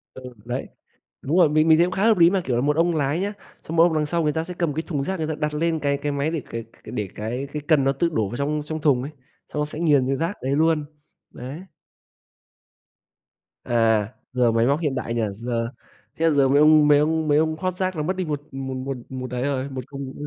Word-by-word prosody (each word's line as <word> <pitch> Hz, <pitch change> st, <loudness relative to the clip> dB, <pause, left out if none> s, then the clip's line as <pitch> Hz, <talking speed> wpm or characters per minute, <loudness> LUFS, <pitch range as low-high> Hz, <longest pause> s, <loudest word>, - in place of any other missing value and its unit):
Ừ, 130 Hz, -, -9 dB, 0.2 s
đấy, 125 Hz, +2 st, -4 dB, 0.5 s
đúng 150 Hz, +6 st, 0 dB
rồi, 170 Hz, -4 st, +6 dB
mình 155 Hz, +1 st, +3 dB
mình 160 Hz, -1 st, +6 dB
thấy 170 Hz, -, +5 dB
cũng -, -, -5 dB
khá 190 Hz, +2 st, -1 dB
hợp 225 Hz, -3 st, +5 dB
lý 170 Hz, -1 st, +7 dB
mà. 190 Hz, 0 st, +1 dB
Kiểu 125 Hz, -, 0 dB
là 120 Hz, -, +1 dB
một 145 Hz, +2 st, +1 dB
ông 170 Hz, +1 st, +2 dB
lái 145 Hz, +1 st, 0 dB
nhá, 200 Hz, +2 st, -2 dB, 0.3 s
xong 165 Hz, -, -5 dB
một 165 Hz, -, +7 dB
ông 170 Hz, -1 st, +3 dB
đằng 155 Hz, -1 st, +1 dB
sau 170 Hz, +2 st, -1 dB
người 150 Hz, -, +2 dB
ta 160 Hz, -, -1 dB
sẽ 180 Hz, +2 st, -7 dB
cầm 170 Hz, -4 st, -1 dB
cái 160 Hz, -, -2 dB
thùng 145 Hz, -6 st, -2 dB
rác, 190 Hz, +6 st, -2 dB
người 160 Hz, -2 st, -2 dB
ta 155 Hz, -, -2 dB
đặt 150 Hz, 0 st, -2 dB
lên 160 Hz, +1 st, 0 dB
cái 140 Hz, -1 st, 0 dB
cái 145 Hz, +1 st, -2 dB
máy 140 Hz, +2 st, -1 dB
để 165 Hz, -3 st, -2 dB
cái 115 Hz, 0 st, -5 dB
c 115 Hz, -, -24 dB
để 105 Hz, -3 st, -3 dB
cái 120 Hz, +6 st, -4 dB
cái 150 Hz, -, -3 dB
cần 155 Hz, -5 st, +4 dB
nó 135 Hz, -, +3 dB
tự 155 Hz, +5 st, 0 dB
đổ 110 Hz, -10 st, 0 dB
vào 120 Hz, -, -5 dB
trong 150 Hz, +2 st, -1 dB
trong 155 Hz, +1 st, -4 dB
thùng 140 Hz, -5 st, +3 dB
ấy, 140 Hz, +4 st, -6 dB, 0.4 s
xong 150 Hz, -, -1 dB
nó -, -, +1 dB
sẽ 150 Hz, +1 st, -8 dB
nghiền 145 Hz, -6 st, +3 dB
ra 135 Hz, -, +1 dB
rác 165 Hz, +7 st, -1 dB
đấy 135 Hz, +2 st, 0 dB
luôn, 160 Hz, 0 st, +2 dB, 0.5 s
đấy. 130 Hz, +5 st, -8 dB, 2.1 s
À, 110 Hz, -3 st, +2 dB, 0.2 s
giờ 125 Hz, -2 st, +3 dB
máy 115 Hz, +1 st, +2 dB
móc 140 Hz, +3 st, +2 dB
hiện 150 Hz, -5 st, -1 dB
đại 115 Hz, -3 st, -3 dB
nhỉ, 120 Hz, -, 0 dB
giờ 115 Hz, +2 st, -3 dB, 0.5 s
thế 165 Hz, -, 0 dB
là 165 Hz, -, +4 dB
giờ 140 Hz, -2 st, +4 dB
mấy 140 Hz, +2 st, +4 dB
ông 150 Hz, 0 st, +6 dB
mấy 145 Hz, -1 st, +6 dB
ông 160 Hz, +1 st, +1 dB
mấy 145 Hz, -1 st, +4 dB
ông 160 Hz, 0 st, +2 dB
hót 185 Hz, -1 st, -1 dB
rác 185 Hz, 0 st, -1 dB
là 155 Hz, -, -2 dB
mất 185 Hz, +5 st, -1 dB
đi 185 Hz, 0 st, -2 dB
một 150 Hz, -2 st, -3 dB
một 135 Hz, 0 st, -5 dB
một 130 Hz, +1 st, -4 dB
một 130 Hz, -1 st, -6 dB
ấy 125 Hz, 0 st, -2 dB
rồi, 140 Hz, -1 st, -1 dB
một 130 Hz, -1 st, -5 dB
thùng 140 Hz, -1 st, -6 dB
150 Hz, 270 wpm, -23 LUFS, 130-160 Hz, 2.1 s, lý